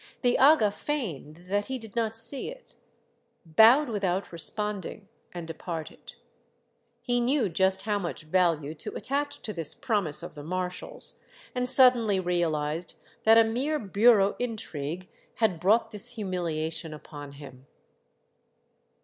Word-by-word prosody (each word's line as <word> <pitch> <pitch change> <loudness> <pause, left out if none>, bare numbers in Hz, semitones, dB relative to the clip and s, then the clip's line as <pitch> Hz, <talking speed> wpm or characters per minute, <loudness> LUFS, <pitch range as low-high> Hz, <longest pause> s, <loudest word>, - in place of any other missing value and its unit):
The 245 -1 +3
aga 265 -7 +5
feigned 175 - -5
that 205 +2 -1
he 265 - -3
did 225 -3 -11
not 225 -1 0
see 240 +4 +1
it, - - -12 0.7
bowed 225 - +6
without 195 -4 -2
responding, 200 +3 -3 0.2
and 175 -2 -7
departed. 165 0 -7 0.9
He 245 -1 0
knew 245 -3 +1
just 190 +2 +2
how 205 -1 0
much 170 -3 -5
value 155 -3 +1
to 155 - -7
attach 285 +5 -3
to 215 - -4
this 165 -4 -4
promise 190 - -1
of 175 - -8
the 145 - -9
marshal's, 180 +3 -4 0.3
and 250 0 0
suddenly 245 -6 +5
realized 170 -2 -1 0.3
that 225 +1 +7
a 230 - +8
mere 255 +8 -1
bureau 205 -2 +3
intrigue 185 -8 -5 0.3
had 205 -7 +1
brought 220 +5 +2
this 235 +3 +1
humilia 170 -6 -3
tion 160 -2 -6
upon 145 -1 -10
him. 140 -2 -13
200 Hz, 135 wpm, -27 LUFS, 165-230 Hz, 0.9 s, a